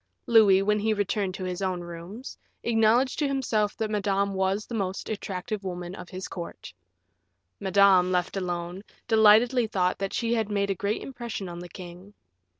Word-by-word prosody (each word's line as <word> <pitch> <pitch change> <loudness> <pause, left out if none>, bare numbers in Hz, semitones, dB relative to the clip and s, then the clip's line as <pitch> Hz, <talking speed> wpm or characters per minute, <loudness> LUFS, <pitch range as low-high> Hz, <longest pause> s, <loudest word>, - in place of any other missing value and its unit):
Louis, 205 -4 +6
when 210 +1 +2
he 215 +1 +1
returned 200 -2 -1
to 190 - -6
his 180 0 -4
own 185 -2 -1
rooms, 175 +8 -8 0.3
acknowledged 235 +3 +3
to 295 - +2
himself 230 -7 0
that 220 -2 -2
Madame 200 -1 0
was 190 +2 0
the - - -9
most 195 -3 -3
attractive 200 0 -4
woman 180 -1 -5
of 180 - -9
his 185 0 -6
court. 170 - -8 0.9
Madame, 190 -2 +4
left 180 +1 0
alone, 175 -1 -3 0.3
delightedly 225 +2 +5
thought 185 -3 0
that 195 0 -2
she 235 -1 0
had 220 -3 0
made 200 -1 0
a - - +2
great 200 +3 -2
impression 240 -6 -6
on 175 0 -7
the 175 0 -9
king. 180 +3 -11
200 Hz, 170 wpm, -27 LUFS, 185-220 Hz, 0.9 s, Louis